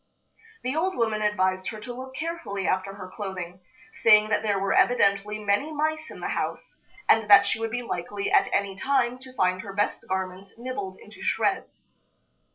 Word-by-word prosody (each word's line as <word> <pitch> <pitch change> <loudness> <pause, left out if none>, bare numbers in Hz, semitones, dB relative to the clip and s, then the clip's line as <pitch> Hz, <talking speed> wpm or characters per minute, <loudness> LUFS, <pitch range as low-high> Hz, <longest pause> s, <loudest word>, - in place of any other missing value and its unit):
The 255 +3 -1
old 370 +4 0
woman 220 -2 +1
advised 185 -3 +1
her 215 - -5
to 245 +3 -6
look 260 +1 -8
carefully 280 - -4
after 190 +1 -1
her 185 -2 -8
clothing, 185 -3 -6 0.4
saying 215 -1 +6
that 210 - +2
there 210 -2 +1
were 195 0 0
evidently 205 -3 +3
many 210 +8 0
mice 310 +1 -1
in - - -10
the - - -2
house, - - -4 0.3
and 220 -1 +4
that 200 0 +9
she - - 0
would 225 0 -2
be 245 +2 -3
likely 395 +10 -3
at 400 -1 +4
any 200 -1 0
time 255 +2 +1
to 260 0 -12
find 185 -3 +1
her 200 -2 -8
best 205 +1 -1
garments 190 +1 -4
nibbled 235 -6 -5
into 210 - -14
shreds. - - -1
210 Hz, 180 wpm, -26 LUFS, 195-255 Hz, 0.4 s, that